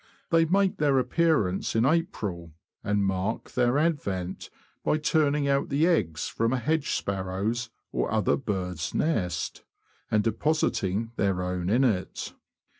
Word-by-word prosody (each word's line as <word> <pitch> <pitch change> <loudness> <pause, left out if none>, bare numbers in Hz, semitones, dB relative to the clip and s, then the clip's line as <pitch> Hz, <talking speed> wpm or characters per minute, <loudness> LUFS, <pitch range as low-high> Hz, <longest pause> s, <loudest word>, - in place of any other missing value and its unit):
They 165 -1 +5
make 190 +3 +2
their 145 -3 +3
appearance 130 - +1
in 115 +2 +3
April, 110 - -1 0.3
and 100 -1 +1
mark 95 +3 -2
their 125 +1 +2
advent 100 - -1 0.3
by - - +2
turning 150 -2 +2
out 140 0 +1
the 145 +3 +2
eggs 90 - +1
from 115 +2 0
a - - +2
hedge 150 +4 0
sparrow's 100 +5 -2 0.2
or - - -1
other 110 -3 +2
bird's 90 - -3
nest, 90 - -1 0.5
and 105 -1 +2
depositing 115 -4 0
their 95 -2 +1
own 90 0 -2
in 120 +6 +3
it. 105 -8 -1
115 Hz, 135 wpm, -27 LUFS, 95-150 Hz, 0.5 s, They